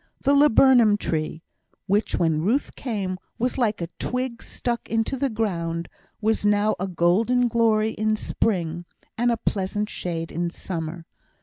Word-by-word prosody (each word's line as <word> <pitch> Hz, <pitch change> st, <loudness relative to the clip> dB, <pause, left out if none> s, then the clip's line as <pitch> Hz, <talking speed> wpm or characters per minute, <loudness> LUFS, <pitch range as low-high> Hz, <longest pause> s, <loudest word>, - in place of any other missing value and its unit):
The 280 Hz, -, +3 dB
laburnum 260 Hz, -6 st, +6 dB
tree, 160 Hz, -3 st, -3 dB, 0.4 s
which 205 Hz, +2 st, +1 dB
when 160 Hz, -2 st, +1 dB
Ruth 230 Hz, -, 0 dB
came 195 Hz, -7 st, -3 dB, 0.2 s
was 250 Hz, +3 st, -1 dB
like 215 Hz, -6 st, +1 dB
a 170 Hz, -, -3 dB
twig 250 Hz, -2 st, -2 dB
stuck 240 Hz, -1 st, -4 dB
into 225 Hz, +3 st, 0 dB
the 275 Hz, +1 st, 0 dB
ground, 170 Hz, -7 st, -2 dB, 0.3 s
was 220 Hz, 0 st, 0 dB
now 205 Hz, +1 st, +3 dB
a 190 Hz, -, -1 dB
golden 205 Hz, +8 st, +2 dB
glory 220 Hz, -2 st, +2 dB
in 215 Hz, 0 st, 0 dB
spring, 175 Hz, -6 st, -1 dB, 0.3 s
and 240 Hz, +1 st, +2 dB
a 235 Hz, -, 0 dB
pleasant 210 Hz, 0 st, -2 dB
shade 165 Hz, -2 st, -4 dB
in 170 Hz, +1 st, -1 dB
summer. 165 Hz, -1 st, -5 dB
210 Hz, 145 wpm, -24 LUFS, 175-235 Hz, 0.4 s, laburnum